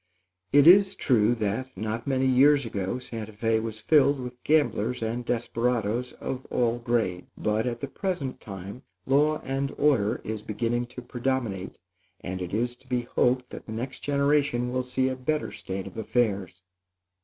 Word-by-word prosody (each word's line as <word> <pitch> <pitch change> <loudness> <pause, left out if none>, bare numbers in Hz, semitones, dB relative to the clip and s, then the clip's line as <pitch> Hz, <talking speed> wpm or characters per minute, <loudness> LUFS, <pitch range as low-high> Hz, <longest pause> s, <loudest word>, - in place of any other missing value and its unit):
It 145 0 +6
is 195 +3 +7
true 120 -2 +3
that, 110 +3 -3
not 110 +4 -3
many 135 -1 +1
years 135 +2 +5
back, 100 +3 -3
Santa 110 -3 -7
Fé 110 +1 +1
was 110 -1 -5
filled 145 +2 +4
with 125 -1 -8
gamblers 125 -6 +1
and 115 +2 -2
desperadoes 120 0 -1
of 130 -1 -5
all 120 -1 +1
grades; 115 -7 -1
but, 105 +2 0
at 120 -1 -3
the 140 - -2
present 150 -4 -3
time, 100 +4 -8 0.2
law 150 +3 +3
and 135 +1 -2
order 130 -9 +2
is 110 -1 -4
beginning 115 +3 -1
to 125 0 -9
predominate, 120 -6 -2 0.4
and 90 +1 -5
it 90 0 -4
is 120 +3 -1
to 130 - -25
be 125 -1 0
hoped 125 +1 0
that - - -9
the 110 - -5
next 125 +4 -5
generation 140 -3 +1
will 130 - +1
see 125 +1 0
a 130 - -1
better 150 +4 -2
state 95 0 -5
of 95 - -10
affairs. 100 -5 -1
120 Hz, 165 wpm, -27 LUFS, 110-130 Hz, 0.4 s, is